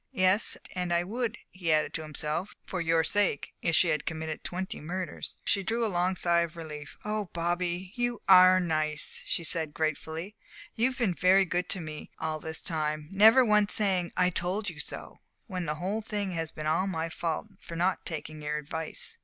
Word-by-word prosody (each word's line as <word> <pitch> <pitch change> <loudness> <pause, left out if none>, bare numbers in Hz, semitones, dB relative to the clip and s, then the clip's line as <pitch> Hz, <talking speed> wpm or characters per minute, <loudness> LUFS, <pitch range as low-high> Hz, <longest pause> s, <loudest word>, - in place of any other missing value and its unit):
(Yes, 185 +3 +3 0.2
and 180 -1 -2
I 170 0 +3
would," 230 +4 -2
he 175 -3 -1
added 155 0 +2
to 160 - -2
himself 155 +4 -3
"for 185 - -3
your 165 -1 +3
sake, 200 -5 0
if 170 -1 +2
she 170 - +4
had 155 -2 -1
committed 160 -1 -4
twenty 185 +1 -4
murders.") 180 +4 -5
She 200 - +2
drew 225 +4 0
a 210 - -1
long 180 +2 +1
sigh 170 -1 +3
of 170 0 -2
relief. 150 -3 -8
"Oh, 210 0 -1
Bobby, 175 +2 -1
you 240 -2 -1
are 185 -1 +8
nice," 155 -4 -1
she 170 - 0
said, 160 -1 0
gratefully. 160 +5 -2 0.4
"You've 255 +3 +1
been 225 -8 +1
very 185 +2 +5
good 175 0 -1
to 190 - +2
me 155 -2 -7
all 160 -1 -2
this 160 +1 -4
time 155 -2 -1
never 220 +6 +7
once 210 -2 +4
saying 185 -5 +2
'I 180 0 +4
told 185 +3 0
you 155 - -13
so,' 150 - -5 0.3
when 180 -3 -4
the 150 - -1
whole 190 +7 -2
thing 205 -3 -2
has 165 -2 -2
been 155 0 -7
all 165 +5 +2
my 165 -3 -2
fault 165 +4 -3
for 165 - -9
not 180 +3 +1
taking 155 -2 -6
your 150 0 -2
advice." 155 +2 -4
175 Hz, 195 wpm, -29 LUFS, 160-190 Hz, 0.4 s, are